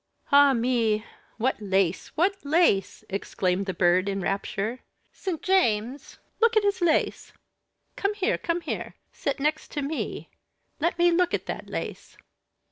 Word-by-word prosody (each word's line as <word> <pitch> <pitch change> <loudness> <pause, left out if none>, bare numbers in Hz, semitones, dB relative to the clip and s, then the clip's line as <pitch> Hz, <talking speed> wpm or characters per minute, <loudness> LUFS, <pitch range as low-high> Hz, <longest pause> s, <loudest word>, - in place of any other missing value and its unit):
_" - - -54 0.3
"Ah! 285 -1 +7
me! 230 -3 +1 0.3
what 240 0 0
lace! 190 -3 +1
what 375 +5 +3
lace!" 285 - +2
exclaimed 190 -1 -1
the 190 - -1
Bird 180 +2 +3
in 195 0 -2
rapture. 200 +5 -2 0.3
"St. 360 -5 -5
James, 265 - +1 0.2
look 460 -1 +4
at 430 - +4
his 405 -2 0
lace. 335 -3 +1 0.6
Come 400 +1 0
here, 400 -2 0
come 340 +1 -1
here, 325 - -5 0.2
sit 280 -1 -2
next 300 +1 -2
me. 290 +2 -3 0.5
Let 340 +3 0
me 345 0 +4
look 355 +1 +2
at - - -5
that - - -6
lace." - - -6
275 Hz, 145 wpm, -26 LUFS, -, 0.6 s, Ah